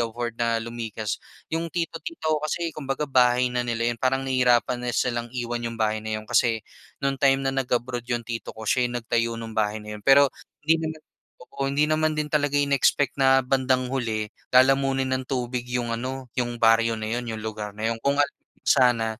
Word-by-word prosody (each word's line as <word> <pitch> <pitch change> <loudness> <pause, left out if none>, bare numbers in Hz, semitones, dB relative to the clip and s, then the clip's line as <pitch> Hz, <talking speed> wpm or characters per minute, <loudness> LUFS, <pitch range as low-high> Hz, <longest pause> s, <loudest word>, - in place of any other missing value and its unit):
afford 120 0 -2
na 115 -1 +2
lumikas. 115 -2 -4 0.4
'Yong 165 +1 -1
tito, 165 -1 -2
tita 325 - -4
ko 150 - +1
kasi, 165 +2 -1
kumbaga 140 0 -2
bahay 125 -1 +4
na 125 - 0
nila 120 0 0
'yon. - - -8
Parang 135 +1 +1
nahihirapan 125 -1 +2
na 120 - 0
silang 120 -1 -1
iwan 120 -1 -3
'yong 115 0 -4
bahay 110 0 +1
na 110 0 -2
'yon, - - -13
kasi 115 -3 +2 0.4
no'ng 135 0 +1
time 135 -1 +4
na 135 - +1
nag-abroad 125 -2 -1
'yong 120 -2 -2
tito 115 -1 -5
ko, 110 - -9
siya 125 -1 +2
yung 120 - -4
nagtayo 115 0 0
ng 115 -1 -7
bahay 105 0 +1
na 105 0 -8
'yon. 105 - -14
Pero 140 +1 +7 0.4
hindi 160 +1 +4
naman, 160 0 -4 0.5
oo, 140 - -6
hindi 145 +2 +2
naman 155 0 +2
din 150 -1 -1
talaga 145 -1 +1
inexpect 140 0 +2
na 135 0 +6
bandang 130 -1 +1
huli, 110 -5 -1 0.3
lalamunin 135 0 +4
ng 130 0 -2
tubig 125 -2 -2
'yong 120 -1 -1
ano, 130 +1 -5
'yong 120 -1 -1
baryo 115 0 +4
na 110 0 -4
'yon, 120 0 -3
'yong 110 -1 -4
lugar 105 -1 -4
na 110 +1 -1
'yon. 115 - -7
Kung 140 0 +2
alam 145 - +6
lang - - -27 0.2
sana, 120 -3 +4
125 Hz, 205 wpm, -25 LUFS, 115-135 Hz, 0.5 s, Pero